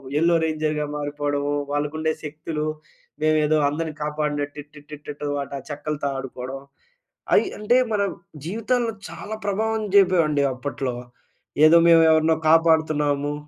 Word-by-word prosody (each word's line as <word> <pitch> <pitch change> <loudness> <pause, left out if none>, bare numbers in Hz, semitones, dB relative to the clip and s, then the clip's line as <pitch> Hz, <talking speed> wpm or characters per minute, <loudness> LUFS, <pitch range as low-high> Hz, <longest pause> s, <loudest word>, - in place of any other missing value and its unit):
Yellow 170 +3 +3
రేంజర్‌గా 155 -1 -1
మారిపోవడము, 145 0 -2 0.2
వాళ్ళకుండే 155 +2 -1
శక్తులు, 150 0 -4 0.6
మేమేదో 155 0 +3
అందరిని 155 +1 -4
కాపాడినట్టు 150 -1 -3
టి, 145 - -13
టి, 150 - -7
టి, 150 - -5
టు 145 - -2
వాట 140 - -5 0.2
చెక్కలతో 145 0 -3
ఆడుకోవడం, 135 0 -7 0.7
అయి - - +4
అంటే, 210 +4 +3 0.2
మన 205 - +1 0.5
జీవితంలో 230 +4 0 0.2
చాలా 220 +1 -7
ప్రభావం 220 +2 0
జేపేవండి 170 -7 +4
అప్పట్లో. 130 -1 -4 0.7
ఏదో 170 +2 +7
మేమెవరినో 160 -1 +5
కాపాడుతున్నాము 155 -3 +3
155 Hz, 115 wpm, -23 LUFS, 145-165 Hz, 0.7 s, ఏదో